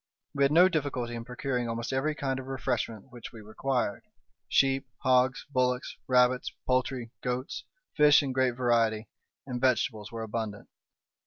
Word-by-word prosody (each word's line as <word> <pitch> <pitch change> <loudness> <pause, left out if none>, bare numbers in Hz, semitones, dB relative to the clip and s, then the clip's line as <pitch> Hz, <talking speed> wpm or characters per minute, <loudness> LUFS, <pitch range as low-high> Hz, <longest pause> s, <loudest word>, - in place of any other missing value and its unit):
We 140 - +1
had 140 - +4
no 175 +4 +7
difficulty 140 -8 -2
in 115 -1 -6
procuring 125 -1 -2
almost 115 +2 -3
every 150 +4 0
kind 135 -2 -2
of 130 - -8
refreshment 125 -4 -3
which 120 -2 -9
we 115 - -11
required—sheep, 135 +3 -1 0.2
hogs, 130 0 +3
bullocks, 125 -1 0
rabbits, 125 0 +3
poultry, 130 -2 0
goats, 125 +1 -3 0.3
fish 150 0 +6
in 135 - -2
great 130 -1 +1
variety, 115 -3 +1 0.4
and 125 -2 -4
vegetables 120 -4 +1
were 115 -1 -5
abundant. 110 -2 -5
125 Hz, 145 wpm, -29 LUFS, 115-135 Hz, 0.4 s, no